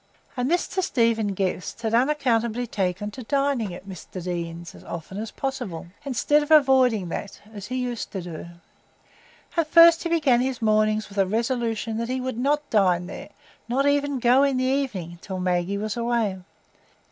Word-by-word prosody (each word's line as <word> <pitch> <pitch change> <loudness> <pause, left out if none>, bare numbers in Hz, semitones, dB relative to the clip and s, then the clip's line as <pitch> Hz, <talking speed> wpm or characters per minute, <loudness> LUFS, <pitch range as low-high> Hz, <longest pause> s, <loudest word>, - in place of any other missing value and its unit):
And 250 0 -1
Mr 355 +2 0
Stephen 230 - +1
Guest 185 +4 -3
had 220 0 -1
unaccountably 245 -3 +1
taken 200 -1 -2
to 255 - -9
dining 275 -4 0
at 180 +2 -10
Mr 185 -4 -10
Deane's 170 -1 -5
as - - -14
often 170 +4 -7
as 220 +1 -4
possible, 245 -12 -5
instead 290 +2 +2
of 295 - -5
avoiding 260 - +4
that, 200 +4 -6
as 205 -1 -8
he 255 - -4
used 250 -2 -3
to 190 - -3
do. 170 -2 -7 1.1
At 335 -2 +1
first 335 0 +7
he 340 - -2
began 285 -8 +3
his 260 -1 -2
mornings 215 -1 +2
with 200 0 -5
a 195 - +3
resolution 225 0 -1
that 230 +1 -3
he 260 +1 -1
would 255 -2 -4
not 290 +3 +1
dine 180 -5 +3
there, - - -8 0.4
not 265 +3 +1
even 285 -1 +1
go 250 +2 +4
in 275 -2 +2
the 255 - 0
evening, 245 -11 -2
till 190 -2 -5
Maggie 180 +1 0
was 210 +1 -3
away. 235 -5 0
230 Hz, 175 wpm, -24 LUFS, 195-265 Hz, 1.1 s, first